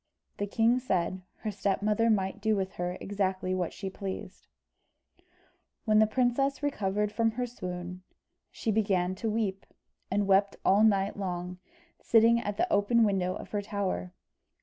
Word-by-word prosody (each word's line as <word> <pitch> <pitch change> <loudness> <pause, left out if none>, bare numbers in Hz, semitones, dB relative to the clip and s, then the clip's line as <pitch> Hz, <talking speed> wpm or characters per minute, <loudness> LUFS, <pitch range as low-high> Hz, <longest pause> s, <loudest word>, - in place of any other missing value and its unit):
The 205 - -2
king 230 +4 +3
said, 185 -6 -1 0.2
her 215 - -2
stepmother 210 +3 +1
might 195 -1 0
do 220 0 +2
with 190 -1 -2
her 180 +1 -2
exactly 190 -2 -1
what 180 -2 -1
she 195 - -6
pleased. 190 0 -7 1.4
When 215 -1 +4
the 220 - +5
princess 260 +5 +1
recovered 210 -6 0
from 225 0 +1
her 250 +2 -1
swoon, 180 -5 -6 0.5
she 225 - -2
began 195 -4 +1
to 220 +4 -3
weep, 210 -3 -1 0.5
and 200 +1 +1
wept 195 +1 +3
all 200 +3 +5
night 200 -2 +2
long, 180 -2 -4 0.4
sitting 230 +1 +5
at 205 -3 -4
the - - +3
open 215 +3 +4
window 190 -3 +1
of - - -9
her 205 - -1
tower. 195 - -3
200 Hz, 150 wpm, -29 LUFS, 190-220 Hz, 1.4 s, the